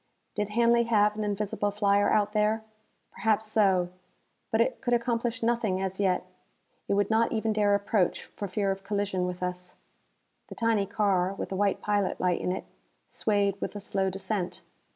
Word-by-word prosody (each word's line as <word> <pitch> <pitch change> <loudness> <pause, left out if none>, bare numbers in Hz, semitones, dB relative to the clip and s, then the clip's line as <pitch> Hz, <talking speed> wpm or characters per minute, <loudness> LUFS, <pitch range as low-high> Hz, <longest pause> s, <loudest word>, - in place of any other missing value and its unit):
Did 210 0 -2
Hanley 235 +2 +3
have 210 -2 +3
an 215 - -2
invisible 205 0 -1
flyer 205 0 +2
out 210 0 +2
there? 215 +1 +1 0.5
Perhaps 220 0 +1
so. 190 -5 +3 0.6
But 220 - +1
it 240 +2 +1
could 245 -2 +2
accomplish 235 -1 -1
nothing 225 -5 +1
as 190 0 -3
yet. 190 -3 +1 0.6
It - - +1
would 205 +1 +1
not 225 +1 +3
even 220 -1 0
dare 205 -1 +3
approach, 200 -2 0
for 200 - -4
fear 195 +1 0
of 195 0 -5
collision 200 -2 -1
with 180 0 -5
us. 180 0 -5 0.7
The - - -9
tiny 225 -4 +1
car, 195 -3 +1
with - - -5
a - - -2
white 200 0 0
pilot 205 -2 0
light 180 -1 +1
in 180 - -1
it, 185 - -4 0.4
swayed 200 -2 0
with - - -4
a - - -4
slow 195 -1 -1
descent. 190 0 -3
205 Hz, 175 wpm, -28 LUFS, 195-220 Hz, 0.7 s, Hanley